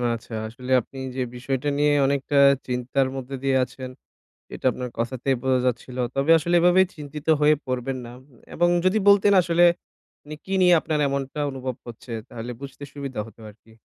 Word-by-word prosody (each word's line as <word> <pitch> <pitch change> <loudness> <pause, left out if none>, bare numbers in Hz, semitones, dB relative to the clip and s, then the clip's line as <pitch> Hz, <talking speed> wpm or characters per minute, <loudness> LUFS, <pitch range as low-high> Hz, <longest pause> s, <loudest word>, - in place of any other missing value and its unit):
আচ্ছা। 115 0 -11
আসলে 125 +3 -8
আপনি 135 - -15 0.2
যে 130 - -2
বিষয়টা 135 +3 -3
নিয়ে 150 0 +3
অনেকটা 140 +1 -1 0.3
চিন্তার 125 +2 0
মধ্যে 135 +1 -6
দিয়ে 135 -1 +2
আছেন 130 0 -7 0.7
এটা - - -5
আপনার 125 0 -5
কথাতেই 130 +3 -1
বোঝা 130 -1 +2
যাচ্ছিল। 125 +1 -3 0.2
তবে 135 +3 0
আসলে 170 +3 -1
এভাবে 180 +2 +5
চিন্তিত 150 0 -9
হয়ে 150 +1 +5
পড়বেন 130 +1 -3
না 120 - -9 0.4
এবং 175 +1 +2 0.2
যদি 185 +4 +3
বলতেন 200 0 +6
আসলে 170 0 +2 0.6
মানে 150 - -8
কী 195 - -7
নিয়ে 180 -1 +6
আপনার 155 -1 -2
এমনটা 140 +1 -4
অনুভব 130 -2 -5
হচ্ছে? 120 +1 -10 0.2
তাহলে 115 +1 -7
বুঝতে 140 0 -10
সুবিধা 140 -5 -5
হতো 115 - -16
আরকি। 110 +2 -22
135 Hz, 170 wpm, -24 LUFS, 125-150 Hz, 0.7 s, বলতেন